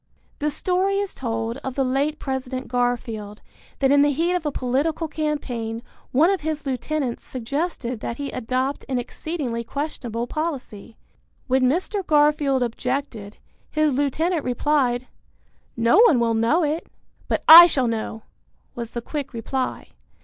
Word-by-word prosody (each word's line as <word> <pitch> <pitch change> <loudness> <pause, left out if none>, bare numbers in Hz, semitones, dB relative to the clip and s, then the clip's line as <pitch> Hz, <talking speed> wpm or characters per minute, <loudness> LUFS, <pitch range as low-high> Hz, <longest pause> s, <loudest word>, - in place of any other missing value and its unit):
The 300 - 0
story 370 +5 0
is 400 -1 -1
told 225 -1 -3
of 265 -2 -6
the 275 - +1
late 275 +4 0
President 265 -2 -4
Garfield 235 -4 -2 0.4
that 270 -1 +2
in 285 0 +6
the 290 - +4
heat 335 +5 0
of 350 -4 -1
a - - -1
political 285 +6 -1
campaign 250 -8 -3 0.3
one 315 +8 +4
of 390 - -1
his 310 -1 -3
lieutenants 265 0 -2
suggested 255 -1 -3
that 235 - -5
he 285 -1 -4
adopt 255 +3 -2
an 260 - 0
exceedingly 250 -1 -4
questionable 240 -4 -4
policy. 250 -7 -5 0.5
When 260 0 +2
Mr. 375 - -1
Garfield 295 -4 +3
objected, 240 -3 -4 0.3
his 310 -2 +1
lieutenant 300 +4 0
replied, 250 -1 +1 0.7
"No 235 - +4
one 390 - +6
will 230 -1 +2
know 230 +10 +2
it." 310 +2 -2 0.4
"But - - -1
I 340 +2 +12
shall 265 -7 +1
know," 225 -1 -3 0.5
was 235 -1 -6
the 235 - -4
quick 285 -1 -5
reply. 255 +3 -3
270 Hz, 145 wpm, -23 LUFS, 240-305 Hz, 0.7 s, I